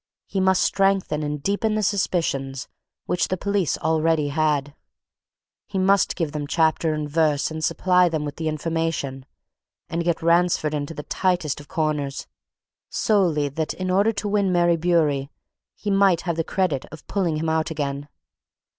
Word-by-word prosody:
He 195 - -3
must 190 0 +3
strengthen 195 -6 +1
and 150 -1 -3
deepen 215 +2 0
the 215 - 0
suspicions 145 -9 -1 0.4
which 180 - 0
the 185 - -2
police 200 -3 0
already 160 -1 +1
had: 145 -1 0 0.9
he 200 - -4
must 190 +1 +3
give 165 -5 -2
them 150 -1 -4
chapter 160 0 +1
and 150 -1 -3
verse 150 -1 +1
and 155 0 -5
supply 180 0 +3
them 155 -2 -2
with 145 +2 -6
information, 155 -4 -2 0.6
and 170 0 -1
get 170 -1 -1
Ransford 170 -2 +2
into 150 +2 -3
the 150 - -6
tightest 175 -6 0
of 145 - -13
corners, 150 -3 -2 0.6
solely 175 -9 +2
that, 155 +3 -3
in 185 0 -2
order 200 +4 +3
to 205 0 -3
win 200 -2 +1
Mary 175 -1 +3
Bewery, 155 -5 +1 0.5
he 205 - -3
might 195 -3 +4
have 170 -3 -2
the 165 - 0
credit 160 -7 -1
of 155 -1 -11
pulling 180 -6 -1
him 160 +1 -2
out 160 0 0
again. 145 -2 -4
165 Hz, 160 wpm, -23 LUFS, 150-185 Hz, 0.9 s, might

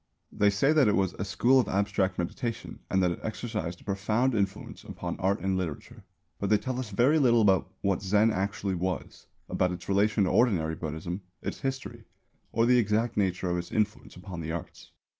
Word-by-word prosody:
They 105 - +3
say 135 +9 +3
that 150 -6 +5
it 105 - +3
was 95 -2 +1
a - - 0
"school 115 +7 +3
of 125 - +1
abstract 100 -1 0
meditation" 115 +6 -4
and 95 0 +2
that 90 - +2
it 85 - -5
exercised 105 -6 -4
a - - -16
profound 105 +6 0
influence 100 -3 -2
upon - - -5
art 95 +1 +1
and 95 +1 0
literature; 90 -6 -5 0.4
but 100 - -1
they 105 - +5
tell 130 +3 -4
us 125 -4 -4
very 125 +10 +3
little 120 -4 +4
about 95 -4 +3
what 100 -2 0
Zen 105 +3 +3
actually 100 0 -2
was, 90 0 -4 0.2
about 90 - 0
its 90 -1 -7
relation 100 +2 +2
to 95 - +1
ordinary 90 -10 +2
Buddhism, 80 +4 -5 0.2
its - - -4
history, 135 -1 -4 0.5
or 115 +1 +2
the 125 0 +5
exact 110 +1 +1
nature 95 -3 0
of 90 - 0
its 85 - -7
influence 110 +1 -1
upon 90 -1 -7
the 80 0 -4
arts. 85 -1 -7
100 Hz, 195 wpm, -28 LUFS, 90-115 Hz, 0.5 s, that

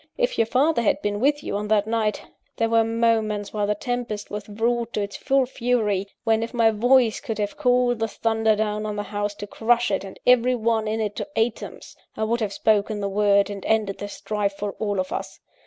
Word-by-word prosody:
If - - 0
your 225 - +3
father 270 +3 +2
had 220 - +2
been 205 0 -1
with 290 +4 +1
you - - -3
on 210 +1 -4
that 210 -1 +2
night, 220 -1 -1 0.3
there 225 - +1
were 230 0 +4
moments, 225 -2 0
while 210 -1 0
the 210 - +1
tempest 240 -2 -4
was 210 0 -6
wrought 235 +2 -1
to 210 - -1
its 200 0 -6
full 270 -1 +2
fury, 230 -6 0 0.2
when, 225 0 +2
if 230 +2 -5
my 225 -1 +4
voice 240 +1 +3
could 225 - -5
have 205 -1 -2
called 250 -3 +2
the 225 - 0
thunder 225 0 +1
down 215 0 -1
on 210 - -3
the 205 - -3
house 205 0 -3
to 205 - -7
crush 235 +3 +1
it 195 - 0
and 195 - -10
every 250 0 +4
one 225 -1 0
in 220 +1 -1
it 210 -1 -2
to - - -3
atoms, 225 0 -3 0.2
I - - -1
would 230 +2 0
have 215 -3 -2
spoken 210 0 +1
the 200 -1 -2
word, 200 0 +3
and 200 -1 -7
ended 215 -3 0
the 205 - -4
strife 205 0 -2
for 205 0 -3
all 205 -3 -1
of 185 - -2
us. - - -5
220 Hz, 225 wpm, -24 LUFS, 205-235 Hz, 0.3 s, were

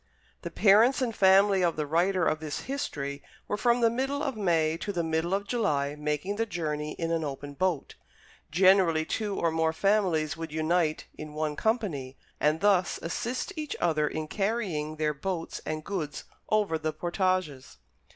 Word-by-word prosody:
The - - -5
parents 220 +6 +5
and 240 -4 -1
family 195 0 +5
of 170 -2 +2
the 150 - -2
writer 175 +4 +2
of 155 - +1
this 155 -2 -4
history 145 - -4 0.3
were - - -1
from 240 +2 +2
the 230 - +5
middle 270 +4 -1
of 275 -4 -2
May 165 -6 +1
to 205 - -4
the 175 -3 -1
middle 160 +2 -1
of 200 +1 -1
July 145 - 0
making 150 +6 -2
the 225 +1 0
journey 150 -5 -3
in 165 -1 -3
an 165 -1 0
open 145 0 -5
boat. 175 -1 -1 0.6
Generally 180 -2 +4
two 205 +3 -2
or 170 - +1
more 160 0 +1
families 180 -6 +1
would 165 -1 -6
unite 160 0 0
in 155 -1 -8
one 155 -1 -1
company, 175 - -1 0.2
and 155 +2 +2
thus 195 -3 +3
assist 235 +9 -3
each 305 -2 -4
other 155 -3 +2
in 155 +1 -4
carrying 195 -7 -2
their 155 -1 0
boats 165 +3 -4
and 155 0 -3
goods 155 -8 -4 0.3
over 205 -7 +1
the 155 0 -2
portages. 175 -4 -1
170 Hz, 170 wpm, -28 LUFS, 155-200 Hz, 0.6 s, parents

